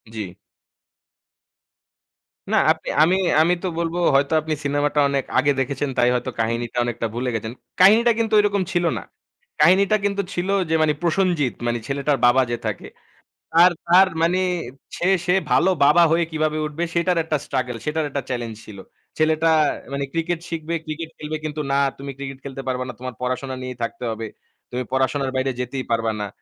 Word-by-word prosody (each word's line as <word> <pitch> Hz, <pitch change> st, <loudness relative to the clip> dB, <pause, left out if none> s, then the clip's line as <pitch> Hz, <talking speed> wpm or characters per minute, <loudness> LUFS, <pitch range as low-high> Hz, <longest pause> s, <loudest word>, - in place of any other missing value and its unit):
জি। 95 Hz, -5 st, -5 dB, 2.2 s
না -, -, +3 dB
আপনি, -, -, -4 dB, 0.2 s
আমি 180 Hz, +4 st, +3 dB, 0.3 s
আমি 175 Hz, +2 st, +3 dB
তো -, -, 0 dB
বলব 170 Hz, 0 st, -2 dB, 0.2 s
হয়তো 140 Hz, +3 st, +2 dB
আপনি 155 Hz, 0 st, -3 dB
সিনেমাটা 145 Hz, +1 st, 0 dB
অনেক 140 Hz, -1 st, 0 dB
আগে 140 Hz, +2 st, +4 dB
দেখেছেন 135 Hz, +1 st, -1 dB
তাই 120 Hz, 0 st, +4 dB
হয়তো 125 Hz, +1 st, -2 dB
কাহিনীটা 115 Hz, +1 st, -2 dB
অনেকটা 115 Hz, -1 st, -2 dB
ভুলে 125 Hz, +1 st, -2 dB
গেছেন 110 Hz, +2 st, -4 dB, 0.3 s
কাহিনীটা 220 Hz, +6 st, +6 dB
কিন্তু 225 Hz, -1 st, -1 dB
এরকম 200 Hz, -1 st, +1 dB
ছিল 175 Hz, -1 st, +1 dB
না। -, -, -6 dB, 0.6 s
কাহিনীটা 200 Hz, +3 st, +5 dB
কিন্তু 200 Hz, 0 st, 0 dB
ছিল 180 Hz, +2 st, -2 dB, 0.2 s
যে 160 Hz, -, +2 dB
মানি 155 Hz, -1 st, +3 dB
প্রসঞ্জিত 170 Hz, -, +1 dB
মানি 120 Hz, 0 st, 0 dB
ছেলেটার 140 Hz, 0 st, 0 dB
বাবা 125 Hz, +2 st, +5 dB
যে 120 Hz, -, -1 dB
থাকে 105 Hz, -3 st, -4 dB, 0.6 s
তার 175 Hz, +2 st, +6 dB, 0.2 s
তার 185 Hz, +2 st, +6 dB
মানি 175 Hz, +3 st, +2 dB, 0.6 s
সে 175 Hz, -, 0 dB, 0.2 s
সে 180 Hz, -, +2 dB, 0.2 s
ভালো 185 Hz, -, +4 dB, 0.2 s
বাবা 170 Hz, +4 st, +6 dB
হয়ে 170 Hz, 0 st, +3 dB
কিভাবে 155 Hz, 0 st, -1 dB
উঠবে 150 Hz, +3 st, -4 dB
সেটার 175 Hz, +1 st, +1 dB
একটা 155 Hz, -2 st, -1 dB
struggle, 125 Hz, -3 st, -2 dB
সেটার 155 Hz, 0 st, -1 dB
একটা 140 Hz, 0 st, -3 dB
challenge 120 Hz, -3 st, -4 dB
ছিল। 100 Hz, -2 st, -11 dB, 0.4 s
ছেলেটা 160 Hz, +1 st, +2 dB, 0.4 s
মানি 140 Hz, 0 st, -1 dB
cricket 165 Hz, 0 st, -1 dB
শিখবে, 165 Hz, 0 st, -4 dB
cricket 160 Hz, +1 st, -5 dB
খেলবে 155 Hz, +1 st, -4 dB
কিন্তু 150 Hz, 0 st, -3 dB
না 140 Hz, -, +2 dB, 0.2 s
তুমি 140 Hz, 0 st, -6 dB
cricket 135 Hz, -1 st, -7 dB
খেলতে 135 Hz, -1 st, -6 dB
পারবা 130 Hz, 0 st, -1 dB
না, 125 Hz, -, -6 dB
তোমার 130 Hz, -1 st, -6 dB
পড়াশোনা 130 Hz, +1 st, -3 dB
নিয়েই 130 Hz, -1 st, -6 dB
থাকতে 120 Hz, +2 st, -5 dB
হবে, 110 Hz, 0 st, -5 dB, 0.5 s
তুমি 125 Hz, +1 st, -2 dB
পড়াশোনার 130 Hz, +1 st, 0 dB
বাইরে 130 Hz, 0 st, 0 dB
যেতেই 125 Hz, +1 st, -3 dB
পারবা 115 Hz, -1 st, +1 dB
না। 105 Hz, -, -2 dB
145 Hz, 175 wpm, -22 LUFS, 125-170 Hz, 2.2 s, কাহিনীটা